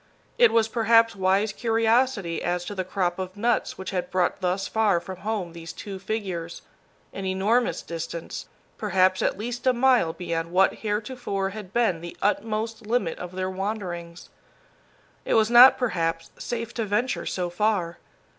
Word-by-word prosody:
It 480 -2 +7
was 225 -1 +3
perhaps 230 0 +3
wise 195 +2 +1
curiosity 225 -5 +1
as 175 0 -1
to 205 - -5
the 190 -2 -2
crop 185 -1 -1
of 185 +1 -5
nuts 235 +3 0
which 190 0 -6
had 180 -2 -2
brought 185 +1 0
thus 185 +2 0
far 215 -5 +2
from 185 +1 -8
home 195 -4 -3
these 165 -1 -8
two 195 -2 -8
figures 185 -5 -4 0.5
an 195 - -5
enormous 195 +1 +1
distance, 165 0 -6 0.3
perhaps 185 -2 +2
at - - 0
least 240 +4 -4
a 255 - +5
mile 245 -8 +3
beyond 165 -1 -3
what 190 +2 +4
heretofore 210 -2 -2
had 205 -2 -9
been 220 -8 +1
the 170 0 -8
utmost 220 +2 -1
limit 215 -8 0
of 180 0 -7
their 185 0 -2
wanderings. 185 -4 -5 0.9
It - - 0
was 220 +1 +3
not, 245 +2 +9
perhaps, 165 -9 -1
safe 235 -1 -5
to 230 - -2
venture 215 +5 -1
so 180 -2 -2
far. 180 -3 0
195 Hz, 160 wpm, -25 LUFS, 180-225 Hz, 0.9 s, not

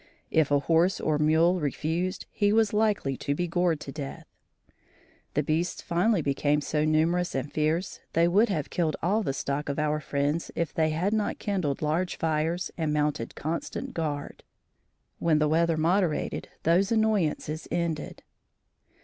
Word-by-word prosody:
If 160 -3 +3
a 145 - +4
horse 165 +5 +2
or 155 -1 0
mule 160 +4 +3
refused, 165 +5 -2
he 205 -1 +2
was 220 -1 +3
likely 210 -10 +1
to 140 - -2
be 175 +3 -1
gored 175 -2 +1
to 135 - -6
death. 140 -1 -7 1.1
The 150 - +2
beasts 160 +4 -1
finally 180 +1 +1
became 145 +1 +1
so 150 +1 0
numerous 165 +3 +1
and 135 +2 -3
fierce 155 +4 0
they 165 +1 +4
would 205 +7 +4
have 155 -7 -2
killed 165 -3 0
all 205 +6 +2
the 160 - -1
stock 140 +2 -3
of 140 - -2
our 150 0 +1
friends 145 +2 -1
if 170 -2 -2
they 160 -1 +2
had 175 +7 0
not 215 -1 0
kindled 180 -9 -2
large 165 +4 0
fires 160 +3 -1
and 160 -2 0
mounted 150 -5 -1
constant 160 +3 -4
guard. 150 -3 -4 0.8
When 160 -2 +3
the 150 0 +2
weather 165 +1 +2
moderated 170 0 0
those 180 +5 +3
annoyances 200 -8 0
ended. 170 -3 -3
160 Hz, 160 wpm, -27 LUFS, 150-180 Hz, 1.1 s, a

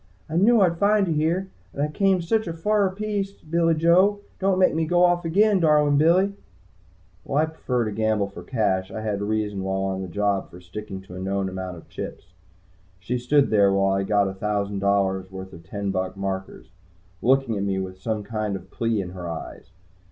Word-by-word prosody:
"I 160 - -5
knew 215 +5 +5
I'd 170 -3 +2
find 205 -1 +3
you 165 - +1
here. 170 +5 0 0.2
And 140 - -2
I - - +1
came 190 +3 +1
sich 220 +5 0
a 165 - -3
fer 200 +4 +1
piece, 200 0 -3
Billy 165 -1 0
Joe! 185 +6 +4 0.2
Don't 195 -1 +2
make 185 -1 +4
me 160 0 0
go 175 +1 +3
off 175 -1 +1
again, 200 +4 +3
darlin' 150 -3 +4
Billy!" 185 +6 +4 0.9
While 145 +3 +1
I - - +3
prefer 125 -7 -2
to 110 - -2
gamble 110 -1 0
for 100 - -10
cash, 100 -6 0
I 110 - -6
had 105 -2 -2
reason 105 -1 -1
while 95 0 -1
on 95 -1 -2
a - - -5
job 100 +2 -1
for 90 - -12
sticking 95 +2 -8
to 95 -1 -13
a 90 - -7
known 95 0 -1
amount 95 -1 -6
of 80 - -14
chips. 90 - -8 0.7
She 120 +7 -2
stood 140 +3 +2
there 100 -2 +5
while 95 0 +2
I 95 - +1
got 100 0 +2
a 95 - -4
thousand 100 0 -2
dollars 95 -1 +1
worth 95 0 -8
of 85 - -11
ten 100 0 -3
buck 95 0 -3
markers, 95 -1 -5 0.5
looking 130 -2 +2
at 100 - -2
me 100 -1 -1
with 95 0 -5
some 110 +1 -2
kind 110 -2 -3
of 95 0 -9
plea 115 -3 0
in 90 -2 -6
her 90 -2 -6
eyes. 80 -1 -7
110 Hz, 210 wpm, -24 LUFS, -, 0.9 s, knew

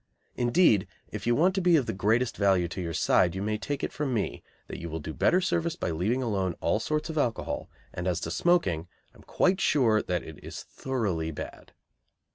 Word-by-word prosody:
Indeed, 120 - +3 0.2
if 105 +1 -5
you 120 - +4
want 180 +7 +3
to 190 - 0
be 175 -1 +5
of 140 -6 +3
the 115 - -2
greatest 110 +6 +1
value 95 -3 +3
to 95 - -5
your 85 -2 -3
side 85 +2 +3
you 95 - -3
may 105 0 -1
take 145 -1 -3
it - - -2
from 140 -4 -1
me 105 - -2 0.2
that - - -7
you 85 - -6
will 80 +1 -4
do 80 +1 -6
better 180 - +3
service 170 -2 0
by 90 - -2
leaving 105 +11 0
alone 95 -7 -1
all 105 - +1
sorts 155 +6 -2
of 155 - -1
alcohol, 120 -5 -2 0.2
and 90 +1 -3
as 90 -2 0
to - - -3
smoking, 95 - +2 0.3
I - - -19
am - - -16
quite 185 +1 +2
sure 115 -7 +3
it - - -7
is 90 -2 -4
thoroughly 100 -12 -2
bad. 80 - -8
110 Hz, 215 wpm, -28 LUFS, 90-150 Hz, 0.3 s, be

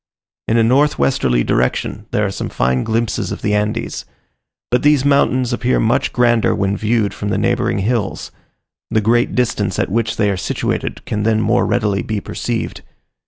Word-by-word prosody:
In 115 - +2
a 115 - +4
north 140 +6 +3
westerly 60 - +1
direction 65 +1 -1
there 105 - 0
are 95 - -2
some - - -4
fine 65 0 0
glimpses 115 0 -1
of - - -6
the 105 - +1
Andes: 105 +2 -2 0.7
but 125 - +3
these 145 -2 +3
mountains 130 -3 +2
appear 125 +1 +1
much 115 +2 +1
grander 120 -2 +2
when 100 0 0
viewed 110 -1 0
from 105 - -4
the - - 0
neighbouring 120 -1 0
hills: 105 +1 -2 0.6
the 110 - +2
great 120 +3 +1
distance 125 -2 0
at - - -1
which 115 +1 -1
they 105 -1 +2
are 95 - -2
situated - - -3
can 105 - -2
then 110 +1 +2
more - - +2
readily 105 -4 0
be 110 -1 -3
perceived. - - -4
115 Hz, 175 wpm, -18 LUFS, 105-120 Hz, 0.7 s, a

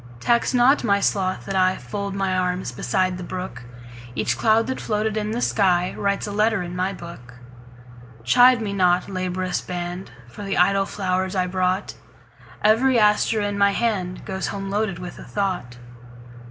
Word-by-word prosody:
Tax 235 - +2
not 255 +3 +4
my 200 -3 +3
sloth 190 -2 0
that 195 - -4
IFold 190 +1 -1
my 195 -1 0
arms 180 -5 -1
beside 180 +9 -1
the - - -6
brook; 180 -9 -6 0.5
Each - - 0
cloud 225 0 +3
that 260 +2 -4
floated 215 0 -1
in 210 -1 -2
the 225 - -2
skyWrites 195 +1 +1
a - - -4
letter 210 -1 +1
in 175 0 -6
my 185 +2 0
book. 170 -10 -10 0.9
Chide 245 - +5
me 200 -2 -3
not, 180 -2 +2
laborious 185 -1 -2
band, 175 +1 -5 0.2
For 120 - -11
the 195 0 -2
idle 195 +2 +3
flowers 185 -1 -2
I 185 -1 +1
brought; 185 +1 -1 0.7
Every 235 +4 +4
aster 210 0 +3
in 205 0 -2
my 200 0 +4
handGoes 190 -3 -2
home 195 -1 -5
loaded 205 -3 -1
with 180 -1 -8
a - - -9
thought. 180 -12 -3
195 Hz, 160 wpm, -23 LUFS, 180-210 Hz, 0.9 s, Chide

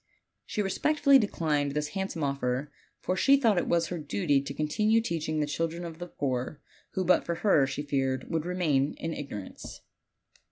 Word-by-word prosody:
She 210 - -1
re 195 - -1
spectfully 290 0 +4
declined 150 - 0
this 150 0 -1
handsome 190 -4 -3
offer, 140 0 -1 0.3
for 185 - -1
she 275 +8 +5
thought 225 -9 +3
it - - -2
was 170 -1 +1
her 175 - -3
duty 140 0 +1
to 140 - -6
continue 210 +9 +2
teaching 160 -7 -2
the 150 - +2
children 165 +3 -3
of 165 -1 -8
the 175 - -5
poor, 130 -2 -3 0.3
who 185 - -1
but 180 - +4
for 170 - -2
her, 150 -9 +5
she 140 +2 -4
feared, 135 -2 -1
would 160 -2 -1
remain 155 -6 +1
in 165 - -4
igno 140 -10 -5
rance. - - -11
160 Hz, 190 wpm, -28 LUFS, 140-185 Hz, 0.3 s, she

